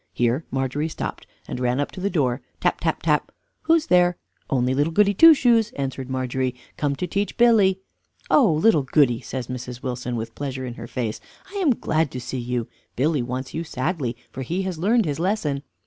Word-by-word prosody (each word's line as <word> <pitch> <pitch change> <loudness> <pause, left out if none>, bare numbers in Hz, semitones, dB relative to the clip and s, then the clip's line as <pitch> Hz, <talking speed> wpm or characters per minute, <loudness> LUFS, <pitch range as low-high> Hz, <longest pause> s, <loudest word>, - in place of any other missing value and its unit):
Here 120 +5 +1
Margery 135 +4 -1
stopped, - - -5 0.2
and - - -5
ran 125 +1 0
up 145 - -1
to - - -9
the 200 - 0
door, 135 -8 0 0.2
tap, - - +1
tap, - - -1
tap. - - +1 0.3
"Who's 325 -1 +3
there?" 180 -1 +4 0.3
"Only 130 -2 +1
Little 145 +4 +1
Goody 200 +4 +4
Two 325 - +8
Shoes," 235 -4 +3
answered 135 -1 -4
Margery, 130 -1 -1 0.2
"come 145 -2 -1
to 180 - -3
teach 200 +2 -2
Billy." 210 -6 +4 0.5
"Oh! 250 - +5
Little 160 +1 +4
Goody," 130 -3 +2
says 130 -2 -5
Mrs. 125 0 -7
Wilson, 125 -1 -3
with 115 0 -4
pleasure 130 -1 -4
in 120 - -5
her 120 0 -8
face, 115 -3 -3 0.3
"I 405 - -6
am 320 -11 +3
glad 160 -5 0
to 130 - -4
see 125 +1 -5
you 120 -1 -2 0.3
Billy 145 +2 +1
wants 130 +2 -4
you 165 - -2
sadly 135 -4 -2
for 130 - -6
he 170 +9 -2
has 185 -4 -4
learned 220 +5 +3
his 150 -1 -2
lesson." 165 -7 0
140 Hz, 195 wpm, -23 LUFS, 125-185 Hz, 0.5 s, Two